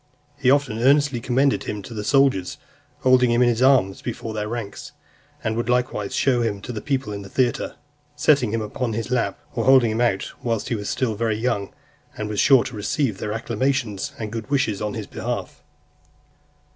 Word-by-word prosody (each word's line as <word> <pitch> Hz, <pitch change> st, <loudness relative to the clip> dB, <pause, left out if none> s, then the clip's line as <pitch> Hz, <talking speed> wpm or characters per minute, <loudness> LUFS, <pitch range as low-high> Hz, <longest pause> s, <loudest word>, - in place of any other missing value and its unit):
He 135 Hz, -3 st, +1 dB
often 135 Hz, -5 st, +2 dB
earnestly 140 Hz, 0 st, +3 dB
commended 130 Hz, +3 st, +1 dB
him 105 Hz, -1 st, -4 dB
to 115 Hz, -, -9 dB
the 105 Hz, -2 st, -4 dB
soldiers, 135 Hz, -7 st, +2 dB, 0.4 s
holding 130 Hz, -1 st, +5 dB
him 120 Hz, +1 st, +4 dB
in 120 Hz, -, +4 dB
his 120 Hz, 0 st, 0 dB
arms 130 Hz, -8 st, +4 dB
before 115 Hz, -2 st, -5 dB
their 105 Hz, -1 st, -3 dB
ranks; 115 Hz, -4 st, -6 dB, 0.5 s
and 110 Hz, 0 st, -1 dB
would 120 Hz, +1 st, -2 dB
likewise 125 Hz, -5 st, 0 dB
show 125 Hz, -3 st, +2 dB
him 110 Hz, -4 st, -1 dB
to -, -, -5 dB
the 110 Hz, -3 st, -5 dB
people 135 Hz, -7 st, -2 dB
in 100 Hz, -, -5 dB
the 100 Hz, -, -10 dB
theatre, 125 Hz, +1 st, 0 dB, 0.4 s
setting 140 Hz, -7 st, +3 dB
him 115 Hz, 0 st, -1 dB
upon 115 Hz, +2 st, -3 dB
his 115 Hz, +2 st, -4 dB
lap, 125 Hz, -2 st, 0 dB
or 115 Hz, -, -1 dB
holding 130 Hz, -4 st, +6 dB
him 110 Hz, +2 st, -1 dB
out 115 Hz, -5 st, 0 dB
whilst 115 Hz, -3 st, -2 dB
he 120 Hz, -, 0 dB
was 105 Hz, -2 st, -4 dB
still 125 Hz, -4 st, 0 dB
very 110 Hz, 0 st, -1 dB
young; 110 Hz, -4 st, -1 dB, 0.5 s
and 105 Hz, 0 st, -3 dB
was 105 Hz, -2 st, -2 dB
sure 135 Hz, -4 st, +6 dB
to 120 Hz, -, -7 dB
receive 110 Hz, +1 st, -1 dB
their 105 Hz, -, -3 dB
acclamations, 115 Hz, -2 st, -1 dB
and 110 Hz, -2 st, -5 dB
good 115 Hz, +2 st, -6 dB
wishes 120 Hz, -8 st, 0 dB
on 105 Hz, -1 st, -2 dB
his -, -, -4 dB
behalf. -, -, -5 dB
115 Hz, 195 wpm, -23 LUFS, 105-130 Hz, 0.5 s, holding